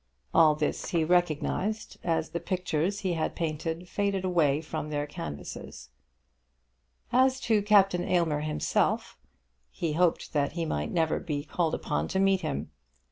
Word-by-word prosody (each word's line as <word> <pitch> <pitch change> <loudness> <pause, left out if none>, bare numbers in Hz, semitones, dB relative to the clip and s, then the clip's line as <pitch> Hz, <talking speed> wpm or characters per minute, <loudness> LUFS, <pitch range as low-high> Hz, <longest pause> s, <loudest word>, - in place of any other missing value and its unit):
All 155 -2 +6
this 150 0 -2
he 170 -2 +1
recognised 175 +5 0
as 165 -2 0
the 170 - -2
pictures 180 +2 -1
he 185 -4 0
had 160 -2 -2
painted 165 +2 -3
faded 200 -1 -1
away 155 -6 +3
from 155 -1 -5
their 145 -1 -1
canvases. 75 - -8 1.2
As 260 +1 +4
to 220 -2 +2
Captain 195 -3 +4
Aylmer 170 -5 +1
himself, 155 0 0 0.5
he 160 - -3
hoped 170 +1 +1
that 145 -2 +1
he 170 0 -2
might 75 - -2
never 160 -2 +1
be 145 -4 -3
called 165 +1 0
upon - - -2
to 190 - -1
meet 195 -1 +3
him. 70 +3 -3
170 Hz, 145 wpm, -28 LUFS, 150-185 Hz, 1.2 s, All